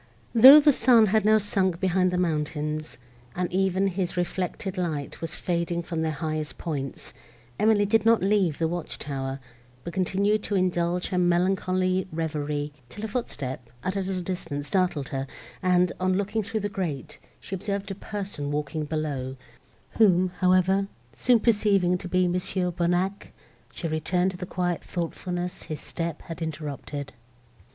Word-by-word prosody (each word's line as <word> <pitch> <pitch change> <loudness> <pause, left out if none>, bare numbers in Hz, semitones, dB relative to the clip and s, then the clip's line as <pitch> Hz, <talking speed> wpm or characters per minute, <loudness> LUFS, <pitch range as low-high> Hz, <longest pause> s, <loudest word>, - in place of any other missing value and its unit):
Though 260 +6 +11
the 295 -1 +5
sun 235 -2 +5
had 215 -2 +3
now 215 0 +6
sunk 190 -4 0
behind 185 -1 +2
the 180 - -1
mountains, 155 -2 -2 0.4
and 180 -1 -2
even 190 0 +2
his 185 -1 -2
reflected 185 +2 -2
light 160 -6 -3
was 165 -2 -3
fading 170 -1 -1
from 165 -1 -3
their 160 0 0
highest 155 -1 -3
points, 140 -5 -5 0.5
Emily 210 -1 +4
did 220 +1 +3
not 225 -3 +4
leave 195 -6 +2
the 165 - +1
watch 175 0 -4
tower, 135 -1 -4 0.4
but 170 - -6
continued 200 +3 +1
to 205 - -1
indulge 180 -1 +1
her 180 - 0
melancholy 185 +1 +1
reverie, 150 -2 -2 0.2
till 210 +9 -6
a - - -2
footstep, 135 - -4
at 185 +1 -2
a - - 0
little 185 -1 -3
distance, 165 -6 -4
startled 155 -3 0
her, 135 0 -3 0.3
and, 180 -1 +3
on 185 0 +1
looking 205 +2 -1
through 220 +1 -3
the 205 - -1
grate, 180 - -4 0.2
she - - -9
observed 200 +1 -3
a - - -1
person 195 -7 -5
walking 150 +1 -2
below, 145 -4 -3 0.6
whom, 185 -4 +5
however, 185 +1 +3 0.3
soon 245 -2 +3
perceiving 205 -5 +3
to 180 - -7
be 180 0 +2
Mons. 180 +3 -2
Bonnac, 180 +2 0 0.4
she 170 - -4
returned 180 +4 0
to 185 - -9
the 180 0 -6
quiet 175 -2 -1
thoughtfulness 175 +1 -4
his 155 - -6
step 170 -1 -5
had 165 +1 -8
interrupted. 145 -2 -5
180 Hz, 160 wpm, -26 LUFS, 160-195 Hz, 0.6 s, Though